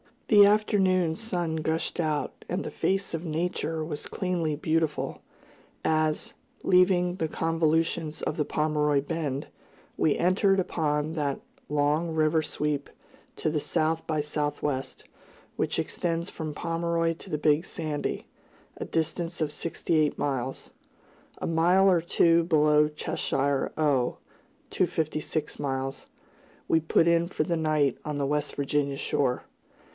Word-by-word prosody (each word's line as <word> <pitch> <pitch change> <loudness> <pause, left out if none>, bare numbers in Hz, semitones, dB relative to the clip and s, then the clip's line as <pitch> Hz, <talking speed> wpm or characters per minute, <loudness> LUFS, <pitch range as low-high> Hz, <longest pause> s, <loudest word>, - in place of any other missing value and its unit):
The 205 -2 +8
afternoon 190 -5 +3
sun 175 -6 -2
gushed 160 +2 -2
out, 155 -3 -2
and 180 +3 -1
the - - -5
face 195 -1 -1
of 165 0 -3
Nature 160 0 -2
was 155 -2 -5
cleanly 175 -5 -1
beautiful, 155 0 -1 0.6
as, 155 -1 0 0.3
leaving 180 -1 +4
the 160 - 0
convolutions 160 0 0
of 155 - -2
the 150 - +1
Pomeroy 150 -2 +1
Bend, 145 -2 -3 0.5
we 155 - +2
entered 195 +2 +3
upon 155 -3 -1
that 145 -4 -2 0.3
long 150 +3 +1
river 155 0 +3
sweep 150 -1 -2 0.5
to - - -1
the 155 0 0
south 160 +2 -1
by 155 -2 0
southwest, 145 -2 -3 0.5
which - - 0
extends 170 -1 -2
from 155 -2 -5
Pomeroy 165 0 0
to 190 - -13
the 150 - -1
Big 150 +2 +2
Sandy, 155 -3 -3 0.5
a - - -4
distance 165 +1 -2
of 150 -2 0
sixty 165 +1 -1
eight 150 -1 +2
miles. 135 -2 -3 0.7
A - - -3
mile 180 +4 +4
or 175 -2 +3
two 170 0 +3
below 150 -2 +4
Cheshire, 140 -2 -1
O. 140 -5 +1 0.5
(256 155 0 -1
miles), 135 -1 -3 0.6
we 165 - +5
put 160 +1 +3
in 170 0 +3
for 165 - -1
the 170 +2 -1
night 155 -4 +1
on 150 -1 -3
the 140 - 0
West 150 +1 -1
Virginia 140 0 0
shore. 130 -2 0
155 Hz, 135 wpm, -27 LUFS, 150-170 Hz, 0.7 s, The